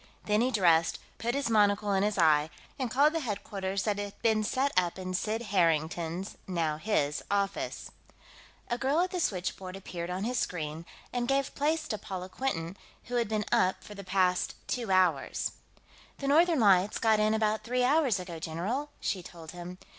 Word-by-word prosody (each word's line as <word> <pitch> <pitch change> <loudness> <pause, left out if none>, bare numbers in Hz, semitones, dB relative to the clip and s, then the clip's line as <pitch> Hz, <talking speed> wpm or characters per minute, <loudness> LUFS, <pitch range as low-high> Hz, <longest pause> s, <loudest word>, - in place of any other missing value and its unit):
Then 210 +1 +2
he 250 - +3
dressed, 170 -8 +3 0.2
put 235 +2 -1
his 280 -2 0
monocle 205 -2 +3
in 190 - +2
his 210 0 0
eye, 155 -3 +4 0.3
and 255 -3 -1
called 285 +6 +4
the 330 - 0
headquarters 200 -5 -3
that 205 -2 0
had 205 -1 -6
been 220 -1 +3
set 265 +6 +1
up 180 -1 +2
in 185 -1 -5
Sid 220 +5 -1
Harrington's 170 +1 0
now 165 -4 -1
his 150 -5 0
office. 200 -1 -2 0.8
A 240 - -2
girl 280 +5 +2
at 365 - 0
the 365 - -2
switchboard 185 - -2
appeared 175 -3 -6
on 185 +2 -3
his 245 +1 0
screen, 160 -1 -3 0.3
and 245 -1 -1
gave 275 +1 +1
place 310 +2 0
to 215 - -3
Paula 185 -1 -6
Quinton, 190 -8 -3 0.3
who 245 0 -3
had 235 -2 +1
been 215 -1 0
up 185 0 +2
for 210 - -10
the 200 -1 -8
past 185 -1 +1
two 240 -4 -2
hours. 185 -6 +2 0.7
"The 275 - -4
Northern 325 +2 +4
Lights 195 -1 +4
got 220 -2 +3
in 215 +1 +3
about 215 0 +1
three 250 +1 0
hours 265 -6 +3
ago, 175 -3 -7
general," 195 - -3
she 190 - -1
told 165 -2 -10
him. 180 0 -8
200 Hz, 185 wpm, -30 LUFS, 180-240 Hz, 0.8 s, eye